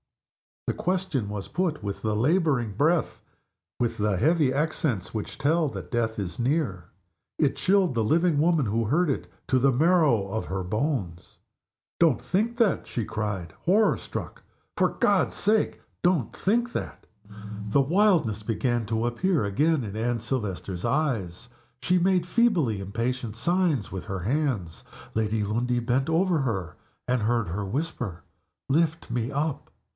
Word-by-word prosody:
_" - - +1
The - - -9
question 175 - -1
was 105 -2 -5
put 170 - -1
with 100 -1 -4
the 110 -1 0
laboring 135 - +2
breath, 155 - +1 0.6
with 115 -1 0
the 105 -2 +1
heavy 155 - +3
accents 145 - -1
which 110 -2 -5
tell 155 +3 +2
that - - -8
death 115 -2 0
is 95 0 -4
near. 120 - 0 0.5
It 145 -3 +2
chilled 190 -4 +2
the 115 -2 +1
living 165 +5 +2
woman 160 -3 +3
who 115 +2 0
heard 155 +9 +2
it 135 - -2 0.2
to 130 - +3
the 135 +2 +4
marrow 145 - +3
of 110 +3 -3
her 95 0 -3
bones. 105 - -3 0.6
"Don't 160 -8 +4
think 210 - 0
that!" 230 -5 +2
she 115 - -3
cried, 100 -7 -4
horror 210 +5 +4
struck. - - -7 0.3
"For - - +3
God's - - +1
sake, 215 +2 +1 0.2
don't 175 -9 +1
think 235 +5 +1
that!" - - -5 0.6
The 140 +7 +4
wildness 160 - +2
began 115 +1 -1
to 110 +1 0
appear 150 - +1
again 145 +8 +1
in 105 -2 -6
Anne 120 +2 -1
Silvester's 105 -6 -3
eyes. 115 - -1 0.3
She 180 0 +3
made 180 -1 +2
feebly 175 - +2
impatient 115 +3 -3
signs 165 - +1
with 95 - -5
her 95 -1 -4
hands. 120 - -1 0.3
Lady 110 -1 0
Lundie 120 +4 0
bent 125 +4 0
over 170 +1 +2
her, 100 - -2 0.3
and 125 -1 +1
heard 115 -3 +1
her 100 +4 -3
whisper, 125 - -4 0.5
"Lift 160 0 +1
me 120 +1 -1
up." 145 +1 -2
125 Hz, 150 wpm, -26 LUFS, 105-165 Hz, 0.6 s, the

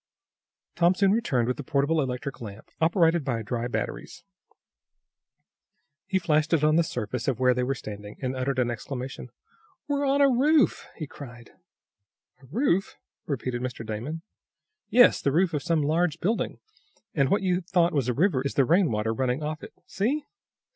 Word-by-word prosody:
Tom 175 +2 +4
soon 195 0 +3
returned 135 - +1
with 125 - -1
the 145 - -5
portable 145 +3 +1
electric 135 +1 -4
lamp, 105 -2 -9
operated 165 -1 +3
by 120 -5 -2
dry 120 +2 -2
batteries. 125 - -5 1.8
He 190 0 +1
flashed 160 -3 +1
it 155 -3 +3
on 155 0 +4
the 170 - +4
surface 125 -4 -4
of 130 -4 0
where 125 -1 +4
they 125 - -1
were 135 +2 0
standing, 105 -3 -8
and 130 -1 -3
uttered 130 0 -1
an 120 -1 +1
exclamation. 125 +1 -6 0.6
"We're 285 -1 0
on 275 +1 +2
a 280 - +6
roof!" 280 +4 +3
he 155 - -5
cried. 120 -6 -11 0.9
"A 135 - -17
roof?" 195 - 0 0.3
repeated 125 -3 -3
Mr. 125 -2 -5
Damon. 120 +10 -5 0.7
"Yes; 245 +1 +6
the 140 - +1
roof 170 +3 +2
of 150 - -1
some 160 +1 +1
large 165 +2 +1
building, 215 +8 -1 0.6
and 140 -4 +2
what 200 - +2
you 180 -1 +1
thought 175 -1 +1
was 140 -5 0
a - - +1
river 160 - +2
is 140 - -3
the 135 - +4
rain 170 +3 +3
water 110 0 -1
running 130 +4 -1
off 155 +1 -4
it. - - -10
See!" 275 +10 -1
145 Hz, 175 wpm, -26 LUFS, 125-175 Hz, 1.8 s, a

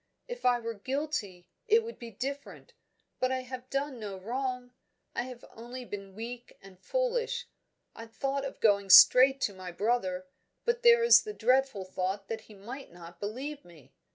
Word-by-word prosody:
If - - -7
I 245 -1 +4
were 230 0 -4
guilty, 225 - -4 0.2
it 445 +1 +5
would 460 +1 -9
be 235 - -8
different. 275 +6 -7 0.5
But 255 0 +1
I 260 0 -1
have 255 0 -8
done 275 -2 -2
no 205 -3 -6
wrong; 250 +4 -4 0.4
I - - -1
have 250 -2 -10
only 245 +2 -9
been 195 -3 -8
weak 240 +2 -8
and 195 -1 -16
foolish. - - -1 0.5
I 230 - -9
thought 275 +4 -2
of 275 - -6
going 200 -2 +3
straight 260 +7 +9
to 205 - 0
my 185 -1 -8
brother, 185 -2 -1 0.4
but 475 0 0
there 470 -1 +6
is 470 - +8
the 425 - -7
dreadful 255 - +1
thought 190 +1 -3
that 225 -1 -4
he 215 -1 -16
might 245 +8 -9
not 170 0 -13
believe 270 +8 -5
me. 150 -6 -18
245 Hz, 175 wpm, -30 LUFS, 200-275 Hz, 0.5 s, straight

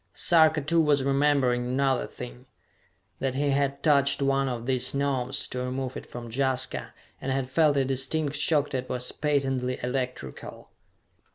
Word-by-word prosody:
Sarka, 160 -2 +5
too, 165 +4 +2
was 145 -3 +2
remembering 135 -3 +2
another 135 +2 0
thing: 125 +1 -10 0.7
that 135 -1 -2
he 140 +1 +1
had 140 0 0
touched 140 -3 +3
one 135 -1 +1
of 120 -2 -4
these 130 0 0
Gnomes, 135 -2 -1
to 125 - -4
remove 130 0 -3
it - - -8
from 120 -1 -8
Jaska 130 +1 -1 0.3
and 135 - -2
had 130 -1 -1
felt 150 +1 +3
a 135 - +2
distinct 135 +3 0
shock 150 0 +2
that 130 -1 -3
was 125 0 -3
patently 135 -4 -1
electrical! 125 - -5
135 Hz, 155 wpm, -27 LUFS, 125-140 Hz, 0.7 s, Sarka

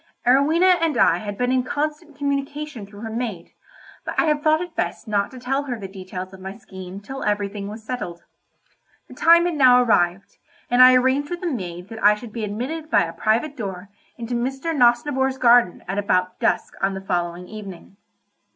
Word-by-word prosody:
Arowhena 315 +9 +4
and 325 -3 +1
I - - +4
had 205 -2 -6
been 250 0 0
in 260 0 +3
constant 300 +3 -4
communication 280 -4 -3
through 205 0 -13
her 225 -1 -5
maid, 220 -7 -4 0.5
but - - -5
I - - +3
had 300 -1 +1
thought 310 0 +4
it 350 -1 -6
best - - -3
not 205 -1 0
to 260 - -12
tell 270 +3 -2
her 245 -4 -4
the 195 - -6
details 185 -1 -8
of 190 - -11
my 190 +1 -8
scheme 190 -3 -10
till 270 +6 -8
everything 205 -1 -2
was 215 +2 -8
settled. 180 -8 -5 0.8
The - - -13
time 340 +1 +5
had 350 - 0
now 255 -4 +6
arrived, 195 -5 +1 0.3
and 245 +1 +5
I 255 0 +9
arranged 260 +3 +2
with 350 0 -5
the 350 -3 -1
maid 180 -6 -6
that 225 -2 -8
I 210 +1 +6
should 215 0 -11
be 230 - -4
admitted 260 +10 -4
by - - +4
a 165 -1 -5
private 225 - 0
door 195 -5 -6 0.3
into 235 0 -5
Mr. 270 +7 -2
Nosnibor's 265 +1 +2
garden 240 -7 +4
at 195 +2 -2
about 185 -2 0
dusk - - 0
on 195 0 0
the 190 - -6
following 175 -1 -3
evening. 200 -3 -10
235 Hz, 195 wpm, -22 LUFS, 195-275 Hz, 0.8 s, I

